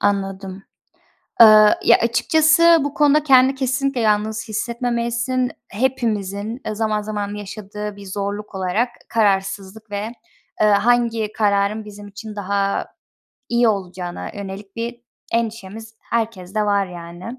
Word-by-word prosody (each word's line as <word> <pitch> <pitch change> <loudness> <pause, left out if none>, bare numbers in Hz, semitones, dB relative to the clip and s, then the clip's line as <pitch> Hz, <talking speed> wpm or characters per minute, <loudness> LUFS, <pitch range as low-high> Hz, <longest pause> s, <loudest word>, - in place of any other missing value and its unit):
Anladım. 195 -1 -2 0.8
Iıı, 215 -1 +8
ya, - - +6
açıkçası 315 +8 +4
bu 285 - -3
konuda 295 0 +3
kendini 265 -1 +5
kesinlikle 270 0 -1
yalnız 215 0 0
hissetmemelisin. 235 +2 -1 0.2
Hepimizin, 220 -2 -2
ııı, 215 - -3
zaman 215 -1 0
zaman 205 -1 -4
yaşadığı 210 0 -7
bir 200 0 -11
zorluk 200 +1 -5
olarak 190 +6 0 0.2
kararsızlık 200 0 -1
ve, 205 +3 -3 0.5
ııı, 210 -1 +5
hangi 230 0 +2
kararın 205 0 +1
bizim 205 0 -10
için 210 +1 -9
daha 200 0 -1 0.6
iyi 235 -1 +3
olacağına 185 -3 -4
yönelik 200 +1 -8
bir 235 +1 -4 0.3
endişemiz 225 -1 -3
herkeste 215 -3 -2
var 200 -1 +1
yani. 175 0 -10
215 Hz, 115 wpm, -20 LUFS, 200-235 Hz, 0.8 s, Iıı